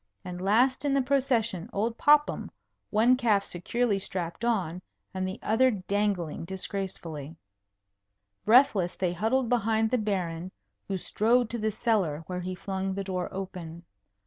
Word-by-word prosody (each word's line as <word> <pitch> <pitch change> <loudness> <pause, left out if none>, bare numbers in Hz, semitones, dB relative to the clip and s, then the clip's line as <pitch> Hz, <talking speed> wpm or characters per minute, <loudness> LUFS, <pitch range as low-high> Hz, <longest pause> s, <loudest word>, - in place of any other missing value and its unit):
And 180 0 -6
last 245 +8 +3
in 280 -1 +1
the 275 - +4
procession, 245 -9 0
old 225 +3 -1
Popham, 295 +3 +3 0.4
one 230 +4 +4
calf 215 -5 +2
securely 205 +4 -1
strapped 180 +1 -4
on, 185 -7 0 0.3
and 185 0 -2
the 190 - -5
other 240 +5 +4
dangling 200 -6 -1
disgracefully. 170 -5 -5 1.1
Breathless 215 -5 +4
they 180 -2 -1
huddled 230 +7 +1
behind 225 -1 +1
the 250 - +2
Baron, 185 -4 -2 0.4
who 195 - -1
strode 230 +5 +1
to 235 - -2
the 220 0 +1
cellar, 200 -9 0
where 180 +1 -4
he 185 +1 -4
flung 190 0 -3
the 195 - -2
door 185 -2 -3
open. 175 -3 -7
200 Hz, 145 wpm, -28 LUFS, 180-235 Hz, 1.1 s, the